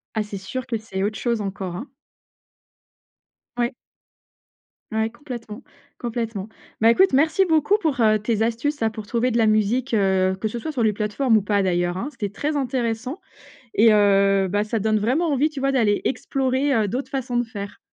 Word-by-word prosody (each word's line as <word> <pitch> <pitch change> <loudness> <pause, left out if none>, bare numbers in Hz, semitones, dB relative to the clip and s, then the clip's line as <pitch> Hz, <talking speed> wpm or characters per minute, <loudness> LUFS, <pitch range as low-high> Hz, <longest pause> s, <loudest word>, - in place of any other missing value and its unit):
Ah, 220 - +1
c'est 210 -1 -5
sûr 255 +7 -6
que 235 -3 -1
c'est 215 -3 -5
autre 205 +1 -1
chose 235 -1 -1
encore, 195 -3 -4
hein. 235 +10 -6 1.7
Oui. 240 +2 0 1.2
Oui, 220 0 0
complètement, 240 -4 -8 0.3
complètement. 225 -4 -4 0.3
Bah, 225 +1 +6
écoute 380 +6 +4
merci 315 +7 +3
beaucoup 320 +3 +3
pour, 310 - -1
heu, 215 -1 +4
tes 220 +1 0
astuces, 235 +6 -1
là, 225 - +2
pour 215 -1 -8
trouver 240 +3 0
de 235 - 0
la 225 - +4
musique, 215 +4 +1
heu, 190 -2 +2
que 220 - -1
ce 235 +3 -5
soit 315 - -4
sur 255 -6 -1
les 215 -1 +3
plateformes 220 +3 +1
ou - - +2
pas, 205 0 +1
d'ailleurs, 175 -1 0
hein. 240 +9 -3
C'était 210 -7 -4
très 295 +10 -3
intéressant 250 - -2 0.6
et 220 +1 +6
heu, 195 -2 +4
bah, 205 +3 0
ça 215 +1 -2
donne 215 +1 +2
vraiment 260 +11 +1
envie, 285 +2 +2
tu 290 -3 -6
vois, 275 0 +1
d'aller 220 -6 +2
explorer, 270 +1 0
heu, 215 -2 +2
d'autres 255 +6 -4
façons 260 -3 -3
de 240 - +2
faire. 205 -3 -8
225 Hz, 190 wpm, -23 LUFS, 205-260 Hz, 1.7 s, Bah